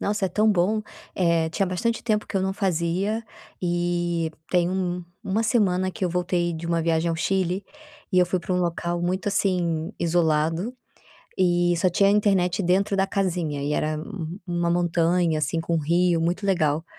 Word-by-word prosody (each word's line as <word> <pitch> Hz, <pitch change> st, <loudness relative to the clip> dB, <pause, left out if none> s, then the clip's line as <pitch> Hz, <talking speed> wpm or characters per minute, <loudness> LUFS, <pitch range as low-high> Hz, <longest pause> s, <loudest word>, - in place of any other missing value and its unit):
Nossa, 205 Hz, 0 st, -1 dB
é -, -, -3 dB
tão 215 Hz, +4 st, +2 dB
bom. 205 Hz, +3 st, +2 dB, 0.3 s
Eh, 170 Hz, -3 st, +2 dB
tinha 195 Hz, +4 st, 0 dB
bastante 230 Hz, +6 st, -1 dB
tempo 215 Hz, -2 st, 0 dB
que -, -, -10 dB
eu -, -, +2 dB
não 190 Hz, 0 st, 0 dB
fazia 190 Hz, +3 st, 0 dB, 0.4 s
e 175 Hz, -1 st, 0 dB, 0.2 s
tem 175 Hz, -1 st, +3 dB
um 180 Hz, -2 st, -2 dB, 0.2 s
1 210 Hz, +4 st, 0 dB
semana 190 Hz, -6 st, +2 dB
que 190 Hz, -, -10 dB
eu 185 Hz, -, +2 dB
voltei 175 Hz, 0 st, 0 dB
de 160 Hz, +1 st, -6 dB
uma 170 Hz, 0 st, +1 dB
viagem 165 Hz, 0 st, +1 dB
ao 165 Hz, -, -1 dB
Chile 185 Hz, +1 st, 0 dB, 0.5 s
e 185 Hz, -, +3 dB
eu 180 Hz, -, +6 dB
fui 180 Hz, +1 st, -1 dB
pra 180 Hz, +2 st, -2 dB
um -, -, +1 dB
local 175 Hz, 0 st, -2 dB
muito, 185 Hz, +3 st, -1 dB
assim, 180 Hz, -3 st, 0 dB
isolado, 165 Hz, +5 st, +1 dB, 0.6 s
e 175 Hz, -1 st, +3 dB
só 180 Hz, +2 st, +2 dB
tinha 195 Hz, +3 st, +3 dB
internet 200 Hz, -3 st, +2 dB
dentro 195 Hz, +3 st, +2 dB
da 195 Hz, 0 st, +1 dB
casinha 175 Hz, -7 st, -1 dB
e 145 Hz, -, -1 dB
era 155 Hz, +1 st, 0 dB
um 170 Hz, 0 st, -6 dB
1 175 Hz, -1 st, 0 dB
montanha, 170 Hz, -1 st, +2 dB
assim, 155 Hz, +3 st, -1 dB
com 170 Hz, 0 st, -2 dB
um -, -, +2 dB
rio 170 Hz, +2 st, +2 dB
muito 175 Hz, +5 st, -1 dB
legal 160 Hz, -4 st, +1 dB
175 Hz, 185 wpm, -24 LUFS, 170-190 Hz, 0.6 s, eu